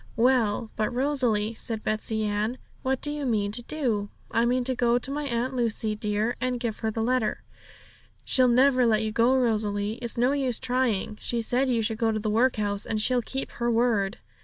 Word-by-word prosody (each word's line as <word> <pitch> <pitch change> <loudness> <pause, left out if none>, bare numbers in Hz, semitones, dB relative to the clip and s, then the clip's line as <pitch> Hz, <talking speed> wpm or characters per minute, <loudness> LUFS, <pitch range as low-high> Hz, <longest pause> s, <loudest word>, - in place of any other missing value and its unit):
'Well, 230 -2 +2
but 215 0 -1
Rosalie,' 245 -5 0
said 220 -1 -3
Betsey 215 0 -1
Ann, 210 +4 -1 0.2
'what 265 0 -1
do 295 - +1
you 295 -1 -4
mean 210 -6 0
to 240 - +1
do?' 235 -7 -2 0.2
'I 230 - +2
mean 250 +1 +1
to 260 +1 +1
go 240 -1 +2
to 255 +2 -4
my 295 +1 -3
Aunt 255 0 -2
Lucy, 225 -3 -1
dear, 210 +2 -1
and 255 -1 -1
give 230 -3 -3
her 220 - -1
the 220 +1 -2
letter.' 245 -2 0 0.8
'She'll 255 -1 +4
never 255 0 +4
let 220 -1 +2
you 215 - -2
go, 235 +4 +3
Rosalie; 215 -3 0
it's 235 -1 -3
no 245 +3 +3
use 265 -4 0
trying. 245 -5 -1
She 235 -1 -1
said 255 +4 +1
you 235 -3 +1
should 220 0 -2
go 225 -1 +2
to 215 - -1
the 215 0 -2
workhouse, 215 -3 +1
and 215 - -1
she'll 245 +3 +2
keep 270 +3 -4
her 240 0 -2
word!' 225 -3 +1
235 Hz, 205 wpm, -26 LUFS, 215-255 Hz, 0.8 s, She'll